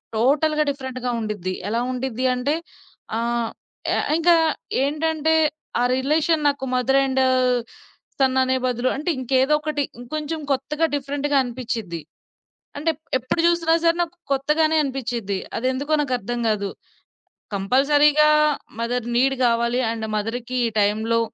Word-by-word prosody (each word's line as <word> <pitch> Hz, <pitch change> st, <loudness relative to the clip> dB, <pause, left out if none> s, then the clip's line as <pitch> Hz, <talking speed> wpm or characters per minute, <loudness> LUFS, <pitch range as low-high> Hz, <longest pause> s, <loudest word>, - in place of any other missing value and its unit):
టోటల్‌గా 300 Hz, +6 st, +2 dB
డిఫరెంట్‌గా 260 Hz, -3 st, -4 dB
ఉండిద్ది. 205 Hz, -4 st, -3 dB, 0.2 s
ఎలా 230 Hz, +2 st, 0 dB
ఉండిద్దంటే, 255 Hz, +2 st, -1 dB, 0.6 s
ఆహ్, 235 Hz, 0 st, -1 dB, 0.5 s
యాహ్ -, -, 0 dB
ఇంకా 340 Hz, +1 st, +5 dB, 0.5 s
ఏంటంటే 315 Hz, +2 st, +1 dB, 0.5 s
ఆ -, -, +3 dB
రిలేషన్ 305 Hz, +3 st, +1 dB
నాకు 280 Hz, -2 st, 0 dB
మదర్ 265 Hz, +2 st, +3 dB
అండ్ 265 Hz, 0 st, +1 dB, 1.0 s
సన్ 265 Hz, -1 st, +3 dB
అనే 260 Hz, 0 st, +1 dB
బదులు, 250 Hz, 0 st, 0 dB
అంటె 305 Hz, +5 st, -3 dB
ఇంకేదో 260 Hz, +3 st, +2 dB
ఒకటి 300 Hz, -2 st, -1 dB, 0.2 s
ఇంకొంచెం 305 Hz, +5 st, -4 dB
కొత్తగా 300 Hz, +4 st, 0 dB
డిఫరెంట్‌గా 285 Hz, +1 st, -1 dB
అనిపిచ్చిది. 230 Hz, -9 st, -4 dB, 0.8 s
అంటే 325 Hz, +3 st, +1 dB, 0.3 s
ఎ -, -, +3 dB
ఎప్పుడు 255 Hz, +6 st, -2 dB
జూసినా 340 Hz, -1 st, +2 dB
సరే 335 Hz, 0 st, +5 dB
నాకు 340 Hz, +1 st, -5 dB, 0.2 s
కొత్తగానే 310 Hz, +3 st, +2 dB
అనిపిచ్చిద్ది, 240 Hz, -7 st, -3 dB, 0.2 s
అదెందుకో 260 Hz, +5 st, 0 dB
నాకర్థం 240 Hz, -3 st, -2 dB
కాదు. 200 Hz, -2 st, 0 dB, 0.9 s
కంపల్సరీగా 290 Hz, +8 st, +4 dB, 0.5 s
మదర్ 240 Hz, 0 st, -1 dB
నీడ్ 270 Hz, +2 st, +3 dB
గావాలి, 235 Hz, +1 st, +2 dB
అండ్ 225 Hz, -1 st, -3 dB
మదర్‌కి 235 Hz, +4 st, -3 dB
ఈ -, -, +2 dB
టైంలో 220 Hz, +3 st, +2 dB
260 Hz, 120 wpm, -22 LUFS, 235-300 Hz, 1.0 s, ఇంకా